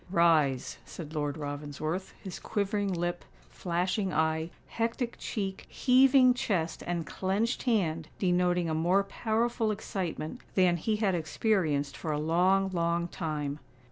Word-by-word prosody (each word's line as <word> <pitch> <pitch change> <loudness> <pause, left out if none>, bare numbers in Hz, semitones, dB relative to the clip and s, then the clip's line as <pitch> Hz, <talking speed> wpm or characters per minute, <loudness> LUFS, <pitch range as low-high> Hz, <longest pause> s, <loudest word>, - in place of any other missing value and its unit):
"Rise," 160 -7 +3
said 160 -3 -9
Lord 145 -1 -2
Ravensworth, 150 +4 -4
his 190 - -6
quivering 205 -1 -1
lip, 175 0 -2 0.3
flashing 180 +3 -1
eye, 160 0 +1 0.2
hectic 235 +1 -2
cheek, 195 -3 -4
heaving 260 0 +5
chest, 195 -10 -1
and 170 -2 -1
clenched 200 - -1
hand 165 -8 +1
denoting 180 -2 +2
a 160 - -1
more 175 +5 +3
powerful 225 +2 0
excitement 190 -1 -4
than 180 -2 +4
he 215 +6 0
had 210 -3 +1
experienced 160 -4 0
for 160 - -4
a 150 - 0
long, 185 +5 +3
long 170 0 0
time. 150 -4 -3
175 Hz, 130 wpm, -30 LUFS, 160-205 Hz, 0.3 s, heaving